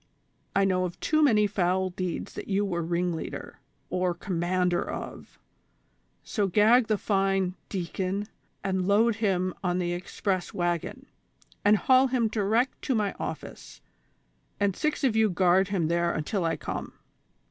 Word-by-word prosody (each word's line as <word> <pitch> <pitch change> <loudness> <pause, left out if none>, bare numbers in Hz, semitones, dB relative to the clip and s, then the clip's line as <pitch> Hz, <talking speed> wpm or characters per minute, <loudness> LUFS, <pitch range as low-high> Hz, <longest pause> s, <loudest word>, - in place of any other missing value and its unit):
I 195 0 +4
know 185 -1 +1
of 175 - -6
too 310 0 +2
many 220 -8 +5
foul 190 -2 0
deeds 180 -1 -4
t1iat - - -7
you 200 0 +1
Avere 170 -4 -2
ringleader 175 -1 -3 0.3
or 180 -1 0
commander 180 0 0
of, - - -7 0.9
so 205 -4 -1
gag 220 +5 +5
the 215 -2 +2
fine 195 -2 +1
(V) - - -18
deacon 190 +2 -3 0.2
(?), - - -43
and 190 -1 -1
load 215 +2 +3
him 185 -4 0
on 180 -1 +1
the 175 -1 -1
express 185 +1 -3
wagon, 175 -2 -2 0.6
and 210 +1 +5
haul 260 +4 +4
him 245 -3 +1
direct 220 +4 0
to 265 - 0
my 210 -2 0
office, - - -7 0.8
and 200 -2 +1
six 305 -1 -1
of 250 -5 +2
you 220 -1 +4
guard 185 +1 +3
him 190 -6 0
tliere 170 +1 +1
until 170 +4 -1
I 165 - 0
come. - - -5
190 Hz, 155 wpm, -27 LUFS, 180-210 Hz, 0.9 s, many